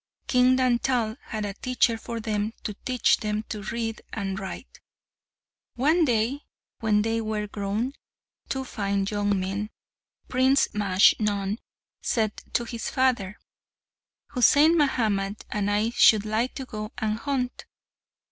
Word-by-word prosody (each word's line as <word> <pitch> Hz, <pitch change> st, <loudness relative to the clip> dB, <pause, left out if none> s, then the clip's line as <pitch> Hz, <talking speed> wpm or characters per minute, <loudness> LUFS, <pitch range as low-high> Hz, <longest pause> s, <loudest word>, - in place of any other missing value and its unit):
King 255 Hz, 0 st, +4 dB
Dantal 245 Hz, -3 st, +1 dB
had 215 Hz, -2 st, -4 dB
a 200 Hz, -, -4 dB
teacher 250 Hz, +1 st, +1 dB
for 230 Hz, +1 st, -6 dB
them 215 Hz, -1 st, -2 dB
to 210 Hz, -, -3 dB
teach 250 Hz, +4 st, +1 dB
them 215 Hz, 0 st, -2 dB
to 210 Hz, -, -4 dB
read 225 Hz, +2 st, -3 dB
and 195 Hz, -2 st, -3 dB
write. 190 Hz, +6 st, -8 dB, 1.0 s
One 315 Hz, +7 st, +3 dB
day, 240 Hz, +3 st, +1 dB, 0.4 s
when 210 Hz, -2 st, +2 dB
they 225 Hz, +1 st, 0 dB
were 215 Hz, -1 st, -2 dB
grown 210 Hz, +5 st, -2 dB, 0.6 s
two 265 Hz, -1 st, -2 dB
fine 200 Hz, -4 st, -1 dB
young 205 Hz, -1 st, 0 dB
men, 195 Hz, +3 st, -3 dB, 0.6 s
Prince 260 Hz, +2 st, +3 dB
Majnun 205 Hz, +1 st, +2 dB, 0.4 s
said 215 Hz, -3 st, 0 dB, 0.2 s
to 240 Hz, -, +1 dB
his 235 Hz, -1 st, -5 dB
father, 240 Hz, -7 st, +1 dB, 0.9 s
"Husain 290 Hz, +5 st, +5 dB
Mahamat 215 Hz, -9 st, 0 dB
and 205 Hz, -1 st, 0 dB
I 210 Hz, +3 st, +1 dB
should 215 Hz, -3 st, +5 dB
like 220 Hz, +4 st, -1 dB
to 265 Hz, -, -5 dB
go 215 Hz, -2 st, -6 dB
and 215 Hz, 0 st, -1 dB
hunt." 255 Hz, -2 st, -2 dB
220 Hz, 130 wpm, -26 LUFS, 205-250 Hz, 1.0 s, Husain